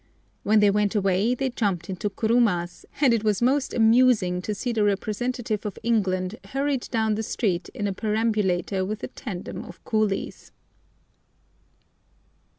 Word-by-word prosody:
When 215 Hz, +1 st, +3 dB
they 205 Hz, -1 st, +5 dB
went 210 Hz, +1 st, +1 dB
away 200 Hz, +4 st, +2 dB
they 265 Hz, 0 st, -1 dB
jumped 195 Hz, -8 st, -1 dB
into 190 Hz, +2 st, -3 dB
kurumas, 205 Hz, -5 st, 0 dB, 0.2 s
and 265 Hz, -5 st, +5 dB
it 225 Hz, -2 st, 0 dB
was 210 Hz, -2 st, +1 dB
most 265 Hz, +3 st, +1 dB
amusing 225 Hz, -6 st, +3 dB
to 210 Hz, +3 st, -3 dB
see 245 Hz, +4 st, -2 dB
the 220 Hz, -2 st, +1 dB
representative 215 Hz, +2 st, -1 dB
of 210 Hz, -3 st, -5 dB
England 195 Hz, -3 st, 0 dB
hurried 275 Hz, -1 st, -2 dB
down 220 Hz, -2 st, +1 dB
the 215 Hz, -, -1 dB
street 195 Hz, -5 st, -1 dB
in 205 Hz, -, -2 dB
a 200 Hz, -, -1 dB
perambulator 210 Hz, -4 st, 0 dB
with 210 Hz, +3 st, -4 dB
a -, -, -4 dB
tandem 195 Hz, -9 st, -7 dB
of 175 Hz, -, -13 dB
coolies. 215 Hz, -3 st, -1 dB
210 Hz, 150 wpm, -25 LUFS, 195-230 Hz, 0.2 s, they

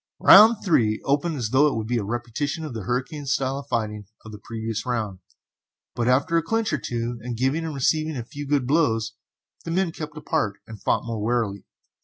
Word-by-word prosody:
Round 220 Hz, +3 st, +8 dB
3 110 Hz, -, +2 dB
opened 150 Hz, +4 st, +1 dB
as 120 Hz, -5 st, -2 dB
though 135 Hz, +5 st, +4 dB
it 145 Hz, -, -1 dB
would 110 Hz, -1 st, -2 dB
be 120 Hz, +1 st, 0 dB
a -, -, -3 dB
repetition 120 Hz, +8 st, -3 dB
of 150 Hz, -, -6 dB
the 110 Hz, -4 st, -6 dB
hurricane 135 Hz, -, -3 dB
style 135 Hz, 0 st, 0 dB
of 140 Hz, -, -11 dB
fighting 105 Hz, -5 st, -3 dB, 0.2 s
of 110 Hz, -, -9 dB
the 105 Hz, -, -9 dB
previous 110 Hz, -1 st, -4 dB
round, 110 Hz, -7 st, -3 dB, 0.7 s
but 120 Hz, 0 st, -1 dB
after 145 Hz, +7 st, +3 dB
a -, -, +3 dB
clinch 225 Hz, +3 st, -1 dB
or 155 Hz, -, +1 dB
two 120 Hz, 0 st, -3 dB
and 120 Hz, 0 st, -5 dB
giving 135 Hz, +7 st, 0 dB
and 160 Hz, -2 st, -4 dB
receiving 155 Hz, +2 st, 0 dB
a 120 Hz, -, -4 dB
few 145 Hz, +4 st, -8 dB
good 140 Hz, -3 st, +1 dB
blows, 115 Hz, -7 st, +1 dB, 0.5 s
the -, -, -6 dB
men 175 Hz, +1 st, +1 dB
kept 155 Hz, -1 st, -7 dB
apart 150 Hz, -9 st, -1 dB
and 110 Hz, -1 st, -11 dB
fought -, -, 0 dB
more 115 Hz, -2 st, -4 dB
warily. 110 Hz, -3 st, -1 dB
125 Hz, 210 wpm, -24 LUFS, 115-150 Hz, 0.7 s, Round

